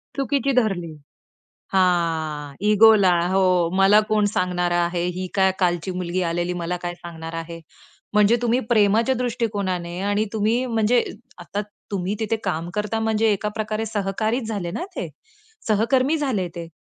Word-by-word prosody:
चुकीची 275 0 0
धरली. 175 -7 -3 0.8
हां. 160 -6 0 0.2
इगोला 210 -3 +6 0.2
हो, 185 -3 +3
मला 195 +2 +6
कोण 215 -1 +2
सांगणार 180 -1 0
आहे, 175 0 0
ही 185 0 -3
काय 190 -1 +4
कालची 175 0 0
मुलगी 180 0 -2
आलेली 175 +1 -1
मला 180 +1 -2
काय 175 0 -3
सांगणार 165 -1 -9
आहे. 165 0 -6 0.5
म्हणजे 210 +2 +4
तुम्ही 240 +2 +2
प्रेमाच्या 225 +3 +3
दृष्टिकोनाने 200 -8 -2
आणि 205 +2 +1
तुम्ही 220 +4 +1
म्हणजे 230 +1 +2 0.4
आता 205 - -4 0.3
तुम्ही 195 0 -2
तिथे 225 +1 0
काम 170 -2 -2
करता, 210 +1 -1
म्हणजे 220 0 +1
एका 210 +1 -1
प्रकारे 215 +1 -2
सहकारीच 215 +3 -1
झाले 195 -6 -3
ना 345 - -4
ते, - - -3 0.6
सहकर्मी 255 +8 +2
झाले 235 - -1
ते. 170 -1 -5
195 Hz, 145 wpm, -22 LUFS, 175-220 Hz, 0.8 s, इगोला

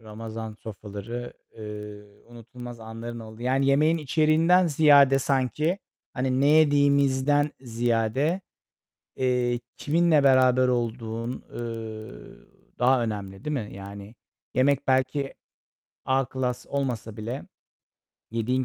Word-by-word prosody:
Ramazan 110 0 -7
sofraları, 110 +3 -7 0.2
eee, 105 -1 -8 0.2
unutulmaz 120 0 -10
anların 115 +1 -7
olduğu 110 +1 -10
Yani 135 +2 +1
yemeğin 155 +4 +3
içeriğinden 160 +4 +3
ziyade 140 -3 +6
sanki, 135 - 0 0.3
hani, 130 0 0
ne 140 - +4
yediğimizden 145 -1 +4
ziyade, 120 - 0 0.8
eee, 125 -2 +1 0.2
kiminle 160 -1 +3
beraber 130 -1 +5
olduğun, 115 -1 -2
ııı, 110 - -8 0.3
daha 125 0 +4
önemli, 100 -3 -5
değil 150 - -1
mi? 115 -7 -3
Yani, 100 +2 -9 0.4
yemek 135 +1 +2
belki 135 +1 +1 0.7
A 135 +1 +2
klas 125 -1 -3
olmasa 120 -6 -3
bile 115 +5 -5 0.9
yediğin 120 +3 0
125 Hz, 105 wpm, -26 LUFS, 115-140 Hz, 0.9 s, ziyade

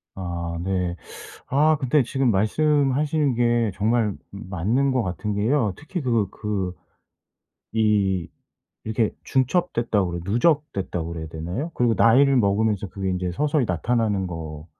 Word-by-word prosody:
아 85 -2 -4
네. 90 -1 -1 0.5
아 155 +4 +3
근데 135 +2 +3
지금 135 0 +1
말씀하시는게 130 0 +2
정말 110 -1 +1 0.2
맞는 100 +8 -1
것 130 -2 +1
같은 100 +2 -3
게요. 110 +1 +1
특히 175 +5 -5
그거 115 - +1
그 100 -4 -3 1.0
이 100 -5 +2 0.6
이렇게 110 0 0
중첩됐다고 120 - +1
그래 85 - -4
누적됐다고 100 - 0
그래야 80 -1 -5
되나요? 85 - -4
그리고 120 -2 +2
나이를 135 +6 +5
먹으면서 105 -1 +1
그게 95 +1 -3
인제 90 -1 -2
서서히 145 - +1
나타나는 105 +1 0
것 80 -3 -7
110 Hz, 290 characters per minute, -23 LUFS, 95-130 Hz, 1.0 s, 나이를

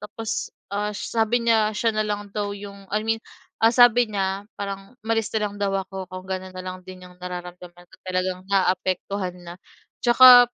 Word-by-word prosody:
tapos, 215 +2 -4 0.2
ah, 210 +1 0
sabi 230 +3 0
niya, 220 -2 +3
siya 225 +1 +2
na 215 0 0
lang 205 -1 -3
daw 205 -1 -2
yung 200 -1 -10
I 210 +2 -1
mean, 225 0 0 0.4
ah, 225 - +7
sabi 245 -1 +6
niya, 195 0 -2
parang 195 +3 -6
umalis 225 -1 +1
na - - +2
lang 205 -1 -3
daw 195 -1 +1
ako 190 0 -5
kung 185 0 -8
gano'n 185 -1 -5
na 185 - -5
lang 185 0 -5
din 185 0 -10
yung 180 0 -15
nararamdaman, 180 0 -8 0.2
talagang 185 0 -1
naaapektuhan 185 0 0
na. 170 0 -8 0.5
Tsaka 245 0 +9
200 Hz, 175 wpm, -24 LUFS, 185-220 Hz, 0.5 s, Tsaka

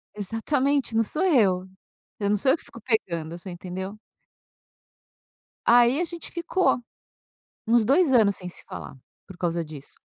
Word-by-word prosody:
Exatamente, 255 +5 0
não 225 - +4
sou 305 - -2
eu. 200 - +3 0.5
Eu 200 -1 0
não 210 - +3
sou 260 +6 +3
eu 295 - +2
que - - -15
fico 235 - -12
pegando, 170 -8 -2
você 180 +2 -9
entendeu. 190 +3 -6 1.7
Aí 240 +4 +5
a 350 - +1
gente 340 0 -7
ficou 340 -2 +1 0.9
uns 230 0 +4
2 280 - +4
anos 215 -5 +4
sem 180 - -7
se 180 - -10
falar - - -8 0.3
por 190 - -12
causa 170 -1 -1
disso. 150 -3 -11
220 Hz, 155 wpm, -25 LUFS, 185-270 Hz, 1.7 s, Aí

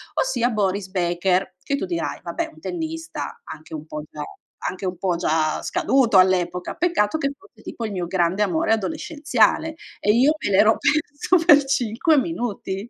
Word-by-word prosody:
ossia, 245 - +1
Boris 200 -3 -1
Baker, 180 +1 0
che 280 - -1
tu - - -3
dirai: 340 -2 -3
"Vabbè, - - -3
un - - -17
tennista", 325 -2 -5
anche 155 0 -10
un 155 0 -6
po' 150 -1 -6
già 150 - -7 0.5
anche 190 0 -4
un 180 -1 -4
po', 180 -1 0
già, 160 -2 0
scaduto, 245 -7 +2
all'epoca, 180 -1 +2
peccato 315 -6 +1
che 275 - 0
fosse, 390 - -21
tipo, 230 - -6
il 215 - -4
mio 180 -3 -3
grande 180 +2 0
amore 190 +1 +1
adolescenziale, 310 - 0 0.2
e 210 - +3
io 260 +7 +4
me - - 0
l'ero 215 +3 +5
perso, 310 +3 +1
per 290 -1 +7
5 270 +4 +1
minuti. 235 - -3
210 Hz, 170 wpm, -22 LUFS, 180-290 Hz, 0.5 s, per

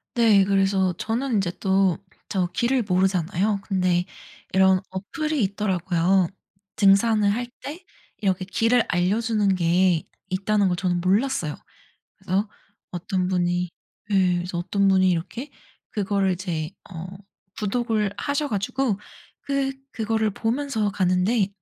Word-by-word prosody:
네 220 -5 +5
그래서 195 -1 +2
저는 235 +2 -1
인제 190 -4 +1
또 190 -2 +2 0.3
저 185 -3 0
길을 250 +2 +1
모르잖아요. 190 +2 +1
근데 185 -3 +1 0.5
이런 190 0 +5
어플이 290 - -2
있더라고요. 190 -2 +1 0.5
'등산을 205 +1 +4
할 240 +4 -1 0.2
때 340 +6 -8 0.3
이렇게 190 -2 0
길을 230 +5 +2
알려주는 205 +3 +1
게 175 -1 +3 0.3
있다.'는 200 +2 +1
걸 180 - +1
저는 175 -1 0
몰랐어요. 190 - +1 0.6
그래서 195 +3 -1 0.4
어떤 180 +1 -2
분이 180 -1 0 0.4
예 185 -2 +3
그래서 175 0 -4
어떤 195 +3 +1
분이 185 -1 +4
이렇게 205 - -3 0.4
그걸 200 -2 0
이제 170 -4 -3 0.2
어 165 -2 -6 0.5
구독을 215 -1 0
하셔 285 +7 -1
가지고 210 +2 -1 0.4
그 275 -1 -1 0.2
그거를 220 -1 0
보면서 225 0 -1
가는데 190 +2 +1
195 Hz, 265 characters per minute, -24 LUFS, 185-220 Hz, 0.6 s, 네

